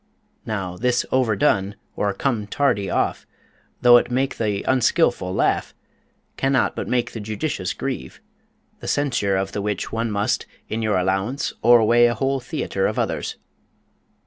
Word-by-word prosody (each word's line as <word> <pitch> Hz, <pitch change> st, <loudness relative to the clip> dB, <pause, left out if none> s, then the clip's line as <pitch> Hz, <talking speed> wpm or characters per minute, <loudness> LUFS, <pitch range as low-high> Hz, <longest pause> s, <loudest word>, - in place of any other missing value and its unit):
Now, 95 Hz, -4 st, -3 dB
this 120 Hz, +3 st, +1 dB
overdone, 105 Hz, -5 st, +2 dB, 0.2 s
or 100 Hz, -, 0 dB
come 115 Hz, -3 st, -1 dB
tardy 105 Hz, -7 st, 0 dB
off, -, -, -1 dB, 0.6 s
though 120 Hz, 0 st, +9 dB
it 120 Hz, -, 0 dB
make 130 Hz, +2 st, -1 dB
the 105 Hz, -3 st, -1 dB
unskillful 125 Hz, -, +2 dB
laugh, -, -, 0 dB, 0.6 s
cannot 135 Hz, -1 st, +1 dB
but -, -, -4 dB
make 120 Hz, -1 st, 0 dB
the 115 Hz, -, -6 dB
judicious 110 Hz, -, -3 dB
grieve; 65 Hz, +1 st, -5 dB, 0.6 s
the -, -, -8 dB
censure 120 Hz, -9 st, +1 dB
of 95 Hz, 0 st, -2 dB
the 100 Hz, -, -3 dB
which 105 Hz, -1 st, -3 dB
one 115 Hz, +1 st, -1 dB
must, 105 Hz, 0 st, -1 dB, 0.2 s
in 110 Hz, -, -3 dB
your 105 Hz, -3 st, +1 dB
allowance, 95 Hz, +8 st, -1 dB
o'erweigh 120 Hz, 0 st, +6 dB
a 120 Hz, -, 0 dB
whole 135 Hz, +3 st, 0 dB
theater 125 Hz, -, -2 dB
of -, -, -3 dB
others. -, -, -2 dB
110 Hz, 145 wpm, -22 LUFS, 100-125 Hz, 0.6 s, though